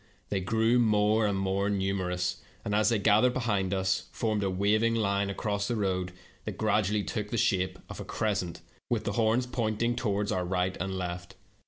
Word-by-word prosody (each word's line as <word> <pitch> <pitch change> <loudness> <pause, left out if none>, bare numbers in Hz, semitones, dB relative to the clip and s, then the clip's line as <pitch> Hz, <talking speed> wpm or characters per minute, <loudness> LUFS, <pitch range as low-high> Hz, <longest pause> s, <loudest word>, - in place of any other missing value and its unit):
They 100 - 0
grew 115 +5 +2
more 110 -1 +3
and 100 -1 0
more 95 +1 0
numerous, 95 -2 -1 0.3
and, 105 - -1
as 105 +2 +3
they 115 - +2
gathered 110 +5 +4
behind 105 -7 0
us, 95 -1 0
formed 110 -2 -1
a 95 - +1
waving 105 +5 +2
line 100 -2 +1
across 100 0 -2
the 120 - -1
road 95 -3 -1 0.3
that - - -5
gradually 105 0 +1
took 105 -2 -3
the 115 - -2
shape 95 -3 +1
of - - -8
a - - -4
cres 105 -2 -1
cent, 85 -3 -5 0.3
with 120 -3 0
the - - -1
horns 115 +3 +2
pointing 120 -1 -1
toward 105 -3 -1
our 90 - 0
right 90 +1 0
and 95 0 -2
left. 90 -1 -5
100 Hz, 190 wpm, -29 LUFS, 95-110 Hz, 0.3 s, gathered